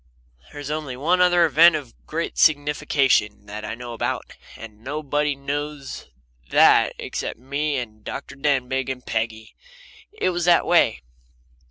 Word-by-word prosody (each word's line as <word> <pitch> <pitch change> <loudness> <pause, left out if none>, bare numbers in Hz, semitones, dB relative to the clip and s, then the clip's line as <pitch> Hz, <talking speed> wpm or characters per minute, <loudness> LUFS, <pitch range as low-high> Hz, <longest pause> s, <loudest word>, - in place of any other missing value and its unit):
There's 145 0 -7
only 150 -5 -4
one 175 +7 +2
other 175 -1 +5
event 160 +2 +6
of 140 -6 -6
great 165 +2 -3
signification 145 -8 +2
that 105 +1 -7
I 110 - -4
know 120 0 -8
about, 115 - -3 0.2
and 110 -1 -12
nobody 145 +1 -1
knows 145 0 -5 0.4
that - - +5
except - - -5
me 140 +3 -2
and 110 -4 -7
Dr. 140 - -7
Denbigh 135 -2 0
and 130 -1 -5
Peggy. 110 -1 -3 0.6
It 415 - -1
was 175 -1 -2
this 175 -1 +5
way. 165 - +2
140 Hz, 140 wpm, -23 LUFS, 120-155 Hz, 0.6 s, event